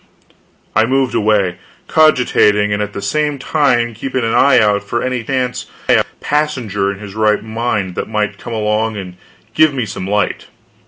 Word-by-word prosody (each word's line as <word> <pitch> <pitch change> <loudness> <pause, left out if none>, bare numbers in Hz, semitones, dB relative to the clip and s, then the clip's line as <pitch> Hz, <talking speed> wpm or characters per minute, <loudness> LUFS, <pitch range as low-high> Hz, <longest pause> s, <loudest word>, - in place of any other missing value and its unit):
I 110 +1 +4
moved 130 +1 +1
away, 100 -4 +1 0.3
cogitating, 105 -9 +3
and 105 - -1
at 105 0 -4
the 100 - -6
same 150 +6 0
time 130 -5 +1
keeping 130 +2 -3
an 115 0 0
eye 140 +2 +5
out 105 -1 +3
for 120 +3 -2
any 125 -2 -2
chance 130 0 -2 0.5
passenger 125 -10 -1
in 100 - -7
his 100 -1 -9
right 110 0 +1
mind 110 -4 -2
that - - -4
might 105 -2 -2
come 120 - -7
along 110 0 0
and 90 -3 -7 0.4
give 155 -2 +4
me 125 -4 -1
some 95 -2 -6
light. 105 +1 -1
110 Hz, 165 wpm, -16 LUFS, 105-130 Hz, 0.5 s, eye